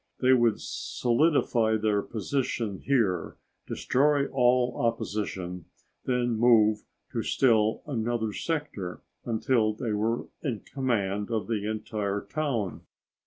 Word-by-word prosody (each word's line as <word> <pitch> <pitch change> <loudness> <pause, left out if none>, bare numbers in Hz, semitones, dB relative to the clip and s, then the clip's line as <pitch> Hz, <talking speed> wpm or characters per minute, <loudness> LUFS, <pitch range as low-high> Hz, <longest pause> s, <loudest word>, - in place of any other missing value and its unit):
They 130 0 +5
would 120 -3 +3
solidify 120 -4 +1
their 105 -1 +1
position 115 -2 -2
here, 105 - 0 0.3
destroy 145 +1 +2
all 125 -1 +3
opposition, 100 -6 -2 0.4
then 120 -3 0
move 110 -3 +4 0.3
to - - -1
still 110 -4 +2
another 115 -5 -1
sector 145 - -4 0.2
until 115 -1 +1
they 115 0 -3
were 110 +3 0 0.2
in 125 -9 -3
command 105 -7 -1
of 110 -2 -1
the 105 -2 -2
entire 105 -2 -2
town. 130 -11 -2
115 Hz, 110 wpm, -28 LUFS, 105-125 Hz, 0.4 s, They